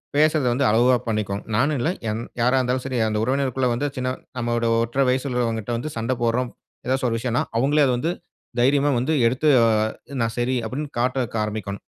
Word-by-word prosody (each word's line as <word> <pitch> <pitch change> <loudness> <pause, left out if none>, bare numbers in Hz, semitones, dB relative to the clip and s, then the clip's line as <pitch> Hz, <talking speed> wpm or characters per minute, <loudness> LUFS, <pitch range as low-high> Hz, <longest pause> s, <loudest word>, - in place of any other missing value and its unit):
பேசுவத 150 -2 +3
வந்து 135 +3 +1
அளவாக 120 +3 +4
பண்ணிக்கணும். 105 -2 -2
நானும் 140 +6 +2
இல்ல 150 - +1 0.2
எந் 110 +2 -2 0.2
யாரா 125 +3 +3
இருந்தாலும் 125 0 0
சரி. 130 -2 -2
அந்த 105 -1 -1
உறவினருக்குள்ள 130 0 0
வந்து 120 +5 -1
சின்ன 130 -1 -2 0.3
நம்முடைய 120 -1 0
ஒற்றரை 125 +4 0
வயது 130 +2 0
உள்ளவர்களிடம் 115 -2 -1
வந்து 125 +6 -4
சண்டை 115 +3 0
போட்றோம் 120 +1 0 0.3
எதாவது 130 +1 0
ஒரு 115 - 0
விஷயம்ன்னா 120 +1 0 0.2
அவுங்களே 145 +5 +3
அத 130 - +2
வந்து 160 +8 -1 0.5
தைரியமா 140 +3 +3
வந்து 135 +6 0
எடுத்து 130 +6 0 0.2
அ - - +5 0.6
நான் 115 0 0
சரி. 120 +2 0
அப்டின்னு 140 +6 -4
காட்ட 130 +1 +1 0.2
ஆரம்பிக்கணும் 105 -2 -5
125 Hz, 180 wpm, -23 LUFS, 115-135 Hz, 0.6 s, அ